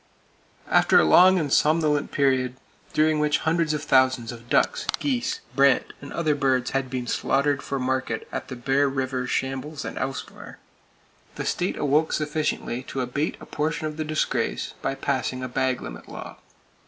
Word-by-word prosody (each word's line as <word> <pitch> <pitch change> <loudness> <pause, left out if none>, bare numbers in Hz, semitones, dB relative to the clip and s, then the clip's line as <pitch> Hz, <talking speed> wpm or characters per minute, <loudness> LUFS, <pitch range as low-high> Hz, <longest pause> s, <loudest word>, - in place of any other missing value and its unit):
After - - +5
a - - +5
long 185 - +7
and 150 -5 0
somnolent 150 -2 +2
period, 130 -3 +1 0.4
during 155 0 +2
which 150 0 +2
hundreds 165 -1 +2
of 150 -1 -2
thousands 130 -4 +3
of 120 0 -12
ducks, - - +1
geese, 255 -4 -1
brant 140 -1 +3
and 140 - -9
other 155 -3 +1
birds 130 -3 +1
had 135 -1 -1
been 125 -1 -3
slaughtered 140 +3 +1
for 140 - -3
market 130 -3 -2
at - - -4
the 130 - -6
Bear 135 +3 +1
River 130 -1 -2
shambles 135 +3 -3
and - - -5
elsewhere, 135 0 -6 0.8
the - - -4
state 180 - -1
awoke 150 +2 +2
sufficiently 150 -5 -1
to 130 0 -5
abate 135 +5 -2
a - - -11
portion 155 +1 -2
of 155 0 -4
the 155 - -1
disgrace 155 0 -1
by 135 - -1
passing 130 -1 -2
a - - -2
bag 130 0 -1
limit - - -9
law - - -9
(1897). - - -35
135 Hz, 170 wpm, -25 LUFS, 130-150 Hz, 0.8 s, long